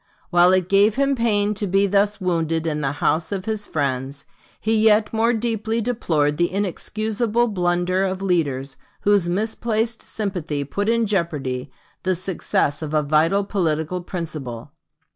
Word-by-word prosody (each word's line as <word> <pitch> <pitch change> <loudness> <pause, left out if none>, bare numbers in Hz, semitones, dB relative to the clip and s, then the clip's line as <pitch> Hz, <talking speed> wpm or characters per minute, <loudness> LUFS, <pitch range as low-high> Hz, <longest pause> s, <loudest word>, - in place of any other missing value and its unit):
While 175 0 +6
it 185 -2 +2
gave 200 +2 +4
him 275 +1 +2
pain 210 -4 +2
to 205 0 -3
be 195 +2 +3
thus 200 +1 +1
wounded 165 -3 0
in 150 -2 -1
the 135 -1 -1
house 160 +3 0
of 195 -1 -3
his 215 -2 -3
friends, 140 -1 -2 0.3
he 220 +1 +1
yet 215 0 +4
more 225 +1 +3
deeply 225 -1 -1
deplored 165 -11 0
the 175 +2 +1
inexcusable 215 +4 -1
blunder 180 -1 +1
of 190 0 -2
leaders 140 -7 -1 0.2
whose 200 -4 +3
misplaced 220 +3 -1
sympathy 175 -9 -3
put 200 +9 -2
in 230 0 +2
jeopardy 150 -10 -2 0.3
the 185 -1 0
success 170 -5 -1
of 155 0 -3
a 150 - +3
vital 160 +7 +2
political 175 -3 -1
principle. 155 -10 -6
185 Hz, 150 wpm, -22 LUFS, 155-215 Hz, 0.3 s, While